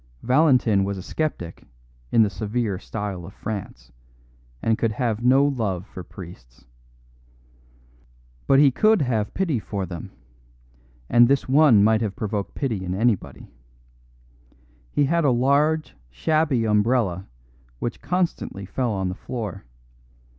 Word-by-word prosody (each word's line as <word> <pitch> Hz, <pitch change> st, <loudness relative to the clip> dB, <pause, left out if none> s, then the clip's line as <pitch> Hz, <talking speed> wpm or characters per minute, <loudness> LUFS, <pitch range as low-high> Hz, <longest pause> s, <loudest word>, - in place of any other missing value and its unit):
Valentin 125 Hz, -7 st, +3 dB
was 100 Hz, 0 st, -2 dB
a 95 Hz, -, -7 dB
sceptic 90 Hz, -, -4 dB, 0.5 s
in 115 Hz, -, +5 dB
the 105 Hz, -, +1 dB
severe 105 Hz, 0 st, -2 dB
style 105 Hz, -5 st, -5 dB
of 95 Hz, +4 st, -11 dB
France, 95 Hz, -, -7 dB, 0.7 s
and 110 Hz, -, +1 dB
could 115 Hz, -2 st, 0 dB
have 115 Hz, -1 st, -2 dB
no 135 Hz, +3 st, +5 dB
love 110 Hz, -10 st, -1 dB
for 90 Hz, -, -9 dB
priests. 85 Hz, -11 st, -13 dB, 1.8 s
But 135 Hz, -, +5 dB
he 140 Hz, -1 st, +6 dB
could 215 Hz, -, +3 dB
have 110 Hz, -5 st, -1 dB
pity 165 Hz, -10 st, 0 dB
for 100 Hz, -1 st, -4 dB
them, 85 Hz, -2 st, -8 dB, 1.0 s
and 120 Hz, 0 st, +6 dB
this 140 Hz, +1 st, +1 dB
one 135 Hz, -6 st, +5 dB
might 110 Hz, +1 st, +3 dB
have 105 Hz, -4 st, -2 dB
provoked 105 Hz, -4 st, -4 dB
pity 115 Hz, -9 st, -2 dB
in 90 Hz, 0 st, -3 dB
anybody. 110 Hz, 0 st, -1 dB, 1.4 s
He 145 Hz, -, +2 dB
had 170 Hz, +4 st, +1 dB
a 145 Hz, -, +4 dB
large, 140 Hz, -, +2 dB, 0.2 s
shabby 135 Hz, -, +1 dB
umbrella, 105 Hz, -4 st, +1 dB, 0.5 s
which 115 Hz, -, -4 dB
constantly 175 Hz, -, -2 dB
fell 125 Hz, +6 st, -2 dB
on 95 Hz, -2 st, -2 dB
the 90 Hz, -, -2 dB
floor. 105 Hz, -, -6 dB
110 Hz, 130 wpm, -23 LUFS, 95-135 Hz, 1.8 s, he